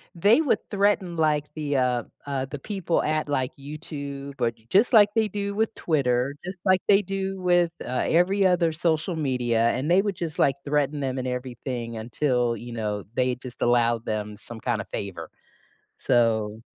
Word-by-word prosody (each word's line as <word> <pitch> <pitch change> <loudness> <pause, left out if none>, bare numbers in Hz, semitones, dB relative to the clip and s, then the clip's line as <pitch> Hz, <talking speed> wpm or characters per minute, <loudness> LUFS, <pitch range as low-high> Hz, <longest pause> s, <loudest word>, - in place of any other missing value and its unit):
they 205 - +5
would 290 - +2
threaten, 200 -4 +1
like, 150 -2 +2
the, 145 -2 -2
uh, 125 -2 +1 0.2
uh, 135 -2 -2
the 140 +1 -7
people 190 -2 -1
at 155 -1 0
like 130 -3 0
YouTube, 140 -1 -7
or 120 -1 +2
j 115 -1 -28
just 215 +6 +4
like 210 -2 +8
they 220 -1 +3
do 200 0 -3
with 220 +1 0
Twitter, 135 -4 +1
just 185 -1 -6
like 185 -1 +4
they 200 0 +6
do 195 0 -4
with, 175 -2 +3
uh, 125 0 -1
every 190 +4 +3
other 175 -3 +3
social 160 +1 0
media, 120 -5 +1
and 145 +7 -1
they 190 +2 +6
would 200 -2 -2
just 165 -3 -5
like 135 - +4
threaten 145 0 0
them 130 -1 -2
and 130 0 -2
everything 125 -2 -4
until, 120 +1 0
you 120 +2 -8
know, 105 -3 -3
they 125 -1 +1
just 125 -1 -10
allowed 120 -1 +2
them 105 -1 -3
some 115 +1 -9
kinda 110 -5 -1
favor. 85 -5 -6 0.7
So 110 -2 +1
140 Hz, 180 wpm, -25 LUFS, 120-175 Hz, 0.7 s, like